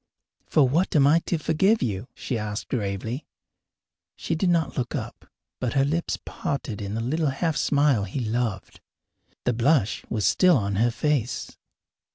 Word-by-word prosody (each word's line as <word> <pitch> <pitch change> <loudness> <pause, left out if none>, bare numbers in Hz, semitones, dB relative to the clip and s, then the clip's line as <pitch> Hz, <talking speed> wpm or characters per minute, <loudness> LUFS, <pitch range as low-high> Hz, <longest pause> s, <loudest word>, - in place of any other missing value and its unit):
"For 145 -4 +4
what 165 +9 +1
am 140 -2 +6
I 155 +4 +5
to 170 - +1
forgive 175 +8 +2
you?" 105 0 -2
she 125 - -4
asked 105 -2 -4
gravely. 110 +4 -3 0.9
She - - -3
did 175 +3 +1
not 165 -5 +1
look 125 -1 -2
up, - - -6 0.3
but 125 -2 -1
her 135 -1 +3
lips 165 +4 -1
parted 125 -7 -4
in 100 +1 -4
the 115 - -2
little 150 +6 0
half 155 +4 -1
smile 140 -8 +2
he 100 +8 -4
loved. 115 -4 -2 0.6
The 125 - +1
blush 120 -1 +2
was 110 -3 -1
still 180 -4 +5
on 100 -3 -1
her 115 +3 +3
face. 125 0 -1
130 Hz, 165 wpm, -25 LUFS, 110-155 Hz, 0.9 s, am